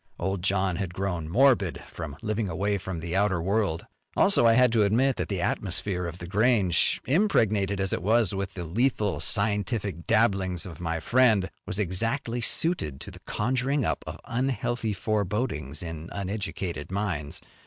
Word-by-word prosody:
Old 95 Hz, -1 st, -2 dB
John 95 Hz, -1 st, +1 dB
had 90 Hz, -3 st, -4 dB
grown 90 Hz, -5 st, -2 dB
morbid 115 Hz, -3 st, +3 dB
from 75 Hz, -4 st, -7 dB
living 110 Hz, -2 st, -1 dB
away 100 Hz, +4 st, 0 dB
from 95 Hz, -2 st, -5 dB
the 85 Hz, +2 st, -4 dB
outer 95 Hz, -2 st, +2 dB
world. 95 Hz, -2 st, 0 dB, 0.3 s
Also, 115 Hz, -, +5 dB
I 115 Hz, -, +6 dB
had 125 Hz, 0 st, +5 dB
to 115 Hz, -2 st, +3 dB
admit 120 Hz, +6 st, +3 dB
that -, -, -3 dB
the 95 Hz, -4 st, -2 dB
atmosphere 90 Hz, -1 st, -1 dB
of 85 Hz, +1 st, -7 dB
The 90 Hz, -, -8 dB
Grange, 100 Hz, -3 st, +2 dB
impregnated 110 Hz, -, +2 dB
as 95 Hz, -1 st, -1 dB
it -, -, -1 dB
was 110 Hz, +1 st, +2 dB
with 95 Hz, -1 st, -4 dB
the 90 Hz, -, -4 dB
lethal 105 Hz, +1 st, 0 dB
scientific 105 Hz, -3 st, 0 dB
dabblings 95 Hz, -6 st, +2 dB
of 85 Hz, -3 st, -9 dB
my 80 Hz, -1 st, -1 dB
friend, 110 Hz, -1 st, +3 dB, 0.2 s
was -, -, -2 dB
exactly 115 Hz, +6 st, -1 dB
suited 115 Hz, -, 0 dB
to -, -, -8 dB
the -, -, -13 dB
conjuring 130 Hz, +5 st, 0 dB
up -, -, -1 dB
of -, -, -6 dB
unhealthy 120 Hz, -3 st, -1 dB
forebodings 100 Hz, -, -2 dB
in 80 Hz, -1 st, -6 dB
uneducated 95 Hz, -5 st, -4 dB
minds. 95 Hz, -8 st, -2 dB
100 Hz, 165 wpm, -27 LUFS, 90-115 Hz, 0.3 s, I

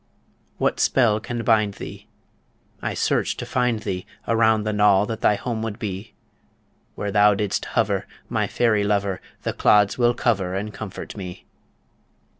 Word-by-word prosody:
What -, -, 0 dB
spell 115 Hz, -5 st, +3 dB
can 120 Hz, +1 st, -4 dB
bind 110 Hz, -4 st, +2 dB
thee? -, -, -9 dB, 0.7 s
I -, -, -2 dB
search -, -, 0 dB
to -, -, -5 dB
find 125 Hz, -3 st, 0 dB
thee 95 Hz, -4 st, -4 dB, 0.2 s
Around 110 Hz, -1 st, +3 dB
the 110 Hz, 0 st, -1 dB
knoll 105 Hz, -1 st, +4 dB
that 110 Hz, +1 st, -5 dB
thy 105 Hz, -, +4 dB
home 115 Hz, +1 st, -3 dB
would 110 Hz, -2 st, -4 dB
be 100 Hz, -3 st, -6 dB, 0.8 s
Where 105 Hz, -1 st, -3 dB
thou 105 Hz, 0 st, +5 dB
did'st 105 Hz, -1 st, -1 dB
hover, -, -, 0 dB, 0.2 s
my -, -, 0 dB
fairy 110 Hz, -4 st, +2 dB
lover, 100 Hz, -2 st, 0 dB, 0.2 s
The -, -, -1 dB
clods 105 Hz, +2 st, +3 dB
will 120 Hz, 0 st, +3 dB
cover 100 Hz, -7 st, 0 dB
and 105 Hz, +2 st, -4 dB
comfort 105 Hz, -2 st, -7 dB
me. 90 Hz, -4 st, -8 dB
105 Hz, 155 wpm, -23 LUFS, 100-115 Hz, 0.8 s, thou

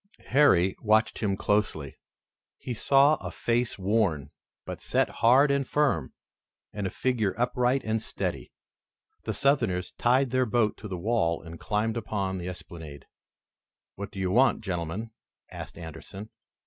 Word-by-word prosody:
Harry 95 Hz, -10 st, +4 dB
watched 110 Hz, 0 st, +2 dB
him 100 Hz, -3 st, 0 dB
closely. 95 Hz, -11 st, 0 dB, 0.6 s
He 125 Hz, -, -5 dB
saw 140 Hz, +5 st, +4 dB
a -, -, -6 dB
face 120 Hz, 0 st, -1 dB
worn, 95 Hz, -8 st, 0 dB, 0.3 s
but -, -, -7 dB
set -, -, +1 dB
hard 135 Hz, +5 st, +6 dB
and 140 Hz, -2 st, 0 dB
firm, 135 Hz, -, +1 dB, 0.6 s
and 100 Hz, -2 st, -2 dB
a -, -, -2 dB
figure 110 Hz, -4 st, -1 dB
upright 125 Hz, +2 st, +1 dB
and 110 Hz, 0 st, -1 dB
steady. -, -, -4 dB, 0.7 s
The -, -, -2 dB
Southerners 115 Hz, -11 st, +1 dB
tied 125 Hz, +1 st, +2 dB
their 130 Hz, -1 st, +2 dB
boat 110 Hz, -1 st, +1 dB
to 105 Hz, -, -8 dB
the 95 Hz, -3 st, -4 dB
wall 90 Hz, -4 st, 0 dB
and 85 Hz, 0 st, -10 dB
climbed 110 Hz, +1 st, -1 dB
upon 100 Hz, -4 st, -2 dB
the 90 Hz, -, -5 dB
esplanade. 80 Hz, -5 st, -10 dB, 0.9 s
"What 100 Hz, +1 st, -6 dB
do -, -, -13 dB
you 95 Hz, -1 st, 0 dB
want, 125 Hz, +4 st, +4 dB
gentlemen?" 90 Hz, +3 st, -4 dB, 0.4 s
asked -, -, -8 dB
Anderson. 85 Hz, +6 st, -9 dB
105 Hz, 145 wpm, -27 LUFS, 90-125 Hz, 0.9 s, hard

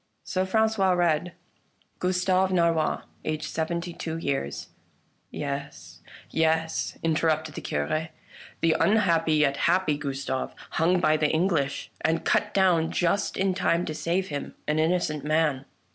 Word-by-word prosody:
So 185 Hz, 0 st, -1 dB
Francois 220 Hz, -2 st, +2 dB
read: 175 Hz, -1 st, +1 dB, 0.3 s
" -, -, -40 dB
Gustave 185 Hz, +1 st, +1 dB
Narrois, 170 Hz, -3 st, +1 dB, 0.2 s
aged 155 Hz, 0 st, -2 dB
seventy 170 Hz, +2 st, -3 dB
two 160 Hz, -1 st, -4 dB
years 135 Hz, -, -3 dB, 0.2 s
" -, -, -40 dB
" -, -, -44 dB
Yes, 140 Hz, -, -6 dB, 0.3 s
yes," 160 Hz, 0 st, 0 dB
interrupted 160 Hz, -1 st, +1 dB
the -, -, -6 dB
Cure, 155 Hz, -, -2 dB, 0.2 s
" -, -, -18 dB
the 165 Hz, -1 st, +3 dB
unhappy 170 Hz, -7 st, +3 dB
yet 145 Hz, -2 st, +2 dB
happy 170 Hz, -4 st, +2 dB
Gustave, 135 Hz, -2 st, -3 dB, 0.2 s
hung 175 Hz, +3 st, +2 dB
by 155 Hz, -2 st, +3 dB
the 150 Hz, -1 st, +2 dB
English, 160 Hz, -4 st, 0 dB
and 165 Hz, +1 st, +1 dB
cut 210 Hz, -, +2 dB
down 180 Hz, -5 st, +3 dB
just 180 Hz, +3 st, 0 dB
in 190 Hz, 0 st, +1 dB
time 175 Hz, -1 st, +1 dB
to 155 Hz, -, -4 dB
save 170 Hz, +5 st, -1 dB
him 145 Hz, -1 st, -5 dB
— -, -, -39 dB
an 150 Hz, +1 st, +1 dB
innocent 160 Hz, -3 st, 0 dB
man. 150 Hz, -3 st, +1 dB
160 Hz, 150 wpm, -26 LUFS, 150-180 Hz, 0.3 s, the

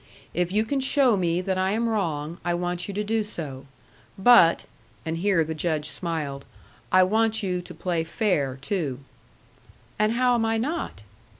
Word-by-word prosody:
If 175 Hz, +1 st, 0 dB
you 215 Hz, +3 st, +2 dB
can 275 Hz, +4 st, -1 dB
show 265 Hz, -3 st, +3 dB
me 175 Hz, -2 st, 0 dB
that 185 Hz, 0 st, -1 dB
I 190 Hz, +1 st, +1 dB
am 230 Hz, +2 st, 0 dB
wrong, 170 Hz, -7 st, -2 dB
I 175 Hz, 0 st, 0 dB
want 175 Hz, 0 st, -2 dB
you 200 Hz, -, -5 dB
to 210 Hz, -, -1 dB
do 220 Hz, +1 st, 0 dB
so. 140 Hz, -9 st, -5 dB, 0.5 s
But," 190 Hz, -5 st, +6 dB, 0.4 s
and 160 Hz, 0 st, -2 dB
here 185 Hz, -2 st, +2 dB
the 160 Hz, +1 st, -4 dB
Judge 155 Hz, -1 st, -1 dB
smiled, 150 Hz, -6 st, -4 dB, 0.5 s
"I 185 Hz, 0 st, +6 dB
want 220 Hz, +3 st, +1 dB
you 180 Hz, -2 st, -1 dB
to 175 Hz, -, -11 dB
play 170 Hz, -3 st, -1 dB
fair, 160 Hz, -, 0 dB
too." 145 Hz, -8 st, -2 dB, 1.0 s
"And 215 Hz, +1 st, +2 dB
how 250 Hz, +1 st, +3 dB
am 235 Hz, -2 st, +1 dB
I 225 Hz, 0 st, +1 dB
not?" 300 Hz, +9 st, -3 dB
185 Hz, 175 wpm, -25 LUFS, 165-220 Hz, 1.0 s, But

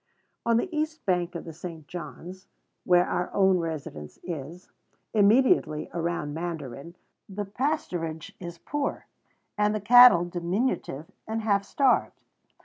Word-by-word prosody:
On 230 Hz, -1 st, +4 dB
the 240 Hz, -, 0 dB
east 310 Hz, +1 st, -2 dB
bank 180 Hz, -2 st, 0 dB
of 170 Hz, -, -6 dB
the 165 Hz, -, -8 dB
St. 165 Hz, -2 st, -9 dB
John's, 180 Hz, +3 st, -9 dB, 0.4 s
where 180 Hz, 0 st, +5 dB
our 180 Hz, -, -2 dB
own 190 Hz, -2 st, +4 dB
residence 150 Hz, -, -6 dB
is, 170 Hz, +1 st, -7 dB, 0.4 s
immediately 215 Hz, -, +3 dB
around 170 Hz, -3 st, -2 dB
Mandarin, 160 Hz, -2 st, -6 dB, 0.3 s
the 205 Hz, +1 st, -4 dB
pasturage 185 Hz, -, -3 dB
is 170 Hz, -1 st, -8 dB
poor, 290 Hz, -, -3 dB, 0.5 s
and 210 Hz, 0 st, +2 dB
the -, -, -1 dB
cattle 240 Hz, -4 st, +8 dB
diminutive 175 Hz, -, -2 dB, 0.2 s
and 220 Hz, 0 st, -3 dB
half 200 Hz, -2 st, +2 dB
starved. 260 Hz, +5 st, +1 dB
180 Hz, 130 wpm, -27 LUFS, 165-215 Hz, 0.5 s, cattle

